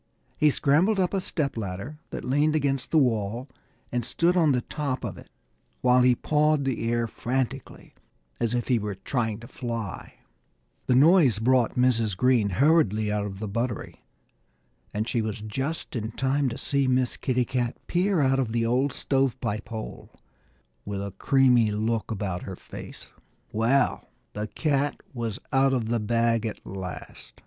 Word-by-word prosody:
He 150 - +4
scrambled 160 +10 +3
up 180 0 +1
a 195 - +1
stepladder 120 - -3
that - - -6
leaned 145 +4 +2
against 135 -3 0
the 160 - +2
wall 120 -2 +1 0.4
and 120 0 -1
stood 170 +9 +1
on 165 -5 +4
the 125 -2 +1
top 140 -1 -3
of 105 -6 -4
it - - -14 0.5
while 125 0 +5
he 125 0 +5
pawed 150 +1 +2
the 115 -3 -1
air 120 0 +1
frantically, 130 +3 -4 0.5
as 115 +1 0
if 120 - -1
he 125 -3 +3
were 105 -1 -4
trying 110 +2 -2
to 120 - -10
fly. 115 -6 -5 0.7
The 125 - +4
noise 145 - +6
brought 120 +1 +2
Mrs. 115 -6 +2
Green 120 -2 +3
hurriedly 110 - +3
out 105 0 -1
of 95 -1 -7
the 110 +2 -4
buttery. 115 +3 -4 0.9
And 110 +2 -2
she 120 - 0
was 110 0 -3
just 135 +11 -4
in 110 -1 -3
time 135 +1 +1
to 120 - -6
see 140 -1 0
Miss 130 -1 +1
Kitty 125 -2 0
Cat 120 -1 -2
peer 180 -1 +1
out 135 -1 +3
of 120 -4 -1
the 115 -1 +1
old 125 +4 +1
stove 135 -2 0
pipe 110 -4 -3
hole, 110 -2 -7 0.7
with 100 -1 -4
a 100 - -5
creamy 125 -5 +4
look 110 +2 -1
about 95 -5 -3
her 95 -2 -7 0.2
mouth. - - -9 0.4
Well, 120 +5 +1 0.2
the 105 +1 -3
cat 145 +2 0
was 115 -4 -3 0.2
out 135 0 +4
of 115 -4 -1
the 120 0 +1
bag 115 +1 +1
at 110 - -7
last. 90 -9 -8
120 Hz, 165 wpm, -26 LUFS, 110-135 Hz, 0.9 s, noise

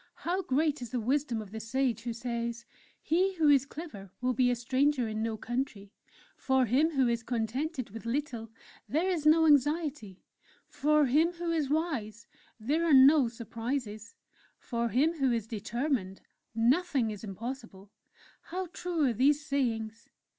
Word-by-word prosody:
How 365 +3 0
great 300 -1 0
is 240 - -6
the 245 - -2
wisdom 245 -1 -1
of 200 - -15
the 220 - -6
Sage 245 +1 -1
who 240 - -4
says: 235 0 -4 0.4
'_He 370 +4 +2
who 315 -4 +3
is 275 -1 +4
clever 285 - -9
will 255 0 0
be 250 +1 +3
a 245 - +2
stranger 260 +1 +1
in 215 0 -3
no 225 -1 -2
country; 235 -4 -4 0.4
for 265 -1 +2
him 270 +8 +3
who 265 -2 +3
is 235 -1 0
contented 250 - -3
with 225 +2 -8
little, 240 -3 -3 0.4
there 320 +6 +1
is 315 -4 0
no 320 +1 +6
anxiety; 290 - +1 0.4
for 300 +1 +2
him 310 +7 +3
who 345 -1 -3
is 310 -5 0
wise, 270 -9 -2 0.3
there 290 +10 0
are 325 -4 +5
no 270 0 +7
surprises; 230 -1 -5 0.4
for 235 -1 -2
him 300 +9 +1
who 265 -2 +2
is 230 -3 -1
determined, 225 -2 -3 0.3
nothing 255 0 +2
is 210 -1 -8
impossible!_' 215 -1 -7 0.6
How 365 0 -4
true 350 -3 -2
are 250 - +2
these 285 +6 +2
sayings! 230 -5 -2
255 Hz, 160 wpm, -30 LUFS, 230-300 Hz, 0.6 s, no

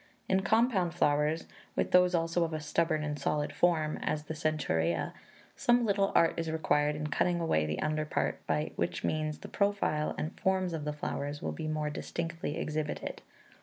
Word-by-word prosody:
In 190 0 +3
compound 205 -5 +2
flowers, 150 +1 +2 0.3
with - - 0
those 180 0 +5
also 165 +1 +1
of 165 -1 -2
a 155 - -1
stubborn 155 0 0
and 150 -1 -3
solid 145 +1 -1
form, 160 -3 +2
as 150 -1 -1
the 160 - -5
Centaurea, 85 - 0 0.4
some 240 0 +3
little 200 -2 +2
art 165 - +5
is 165 -1 -1
required 150 -2 +1
in 150 0 -3
cutting 175 +3 +1
away 80 - +1
the 75 0 -2
under 155 0 0
part, - - -1
by 150 +1 0
which 85 0 -1
means 155 -1 -1
the - - -9
profile 200 -7 0
and 155 - -3
forms 190 -2 +1
of 155 -2 -3
the 150 - -1
flowers 145 0 -3
will - - -1
be 160 - -5
more 155 -1 -1
distinctly 165 0 -4
exhibited. 155 -2 -3
155 Hz, 180 wpm, -31 LUFS, 150-175 Hz, 0.4 s, those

